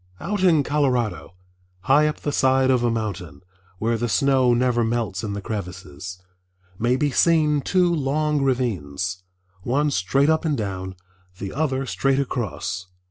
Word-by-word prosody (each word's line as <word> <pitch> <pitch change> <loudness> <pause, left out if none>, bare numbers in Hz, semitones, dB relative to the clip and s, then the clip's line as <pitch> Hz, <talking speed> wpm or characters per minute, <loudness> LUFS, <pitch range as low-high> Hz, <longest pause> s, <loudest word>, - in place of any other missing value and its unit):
Out 200 +4 -3
in 165 -6 +4
Colorado, 125 -12 -1 0.5
high 145 +9 +4
up 150 - -4
the 145 - -2
side 130 -1 +3
of 125 -2 +2
a 120 - +2
mountain, 95 -10 -4 0.4
where 115 +3 0
the 120 +1 -1
snow 130 0 +3
never 120 -1 +2
melts 115 -5 -2
in 105 -2 -3
the 100 0 -5
crevices, 90 -4 -6 0.6
may 120 +2 +2
be 145 +2 0
seen 150 -1 +3
two 180 +3 +2
long 150 0 0
ravines, 95 - -1 0.4
one 145 +7 0
straight 135 +7 +1
up 160 0 +2
and 155 -4 0
down, 95 -3 -4 0.4
the 95 0 -6
other 135 -2 -1
straight 135 +6 0
across. 100 -9 -3
125 Hz, 150 wpm, -23 LUFS, 100-145 Hz, 0.6 s, in